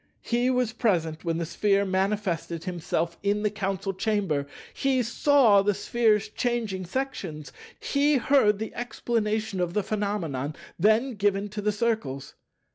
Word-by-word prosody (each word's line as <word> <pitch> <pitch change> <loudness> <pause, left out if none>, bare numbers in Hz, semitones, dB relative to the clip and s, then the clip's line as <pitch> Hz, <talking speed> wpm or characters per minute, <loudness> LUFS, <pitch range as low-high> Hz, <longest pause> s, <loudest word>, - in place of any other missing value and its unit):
He 240 +1 +1
was 250 -3 +1
present 165 -9 0
when 165 -1 -1
the 170 - -2
Sphere 200 +4 +1
manifested 190 -4 -1
himself 170 -2 -2
in 205 +1 0
the 210 - +1
Council 195 -2 -2
Chamber; 190 -8 0 0.3
he 265 -2 +1
saw 235 -3 +4
the 205 0 +1
Sphere's 220 0 +2
changing 220 -5 -2
sections; 185 - -4 0.3
he 285 0 +2
heard 240 -5 +3
the 220 +2 -5
explanation 220 -3 -2
of 175 -1 -1
the 210 - +1
phenomena 190 -10 -2 0.3
then 220 +5 +3
give 205 -1 0
to 210 +1 -4
the 210 +1 +1
Circles. 210 - -2
205 Hz, 140 wpm, -26 LUFS, 185-230 Hz, 0.3 s, saw